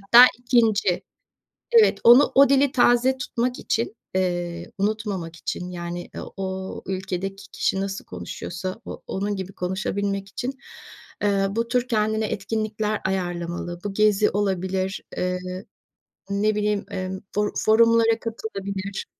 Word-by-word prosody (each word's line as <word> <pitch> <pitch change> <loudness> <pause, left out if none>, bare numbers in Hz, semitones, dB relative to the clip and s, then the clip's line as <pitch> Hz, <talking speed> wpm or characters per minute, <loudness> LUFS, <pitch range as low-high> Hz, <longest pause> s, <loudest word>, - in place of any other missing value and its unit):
hatta 235 +5 +9
2'nci. 225 -7 +2 0.7
Evet. 455 -2 +6
Onu 245 +5 +8
o 275 -1 +7
dili 275 0 +4
taze 250 +1 +4
tutmak 250 0 -2
için, 225 0 -1 0.2
eee, 175 -1 -1
unutmamak 200 -5 -2
için, 180 +2 -4
yani, 175 0 -5
eee, - - -5 0.2
o 190 0 -4
ülkedeki 190 +1 -4
kişi 190 - 0
nasıl 195 0 -4
konuşuyorsa 185 +2 -6
o - - -8
onun 200 +1 -2
gibi 190 0 -6
konuşabilmek 195 +2 -2
için, 260 +6 -5 0.6
eee, 200 -1 +2
bu 230 +3 -1
tür 250 +1 0
kendine 220 -1 +1
etkinlikler 215 +1 -2
ayarlamalı. 175 -2 -3
Bu 205 - -2
gezi 210 0 +4
olabilir, 190 -1 -1
eee, 180 0 -1 0.9
ne 205 +2 +1
bileyim, 210 -1 0
emm, 185 0 -4 0.2
for 210 0 +1
forumlara 230 +1 +4
katılabilir, 200 -4 -5
200 Hz, 125 wpm, -24 LUFS, 190-225 Hz, 0.9 s, hatta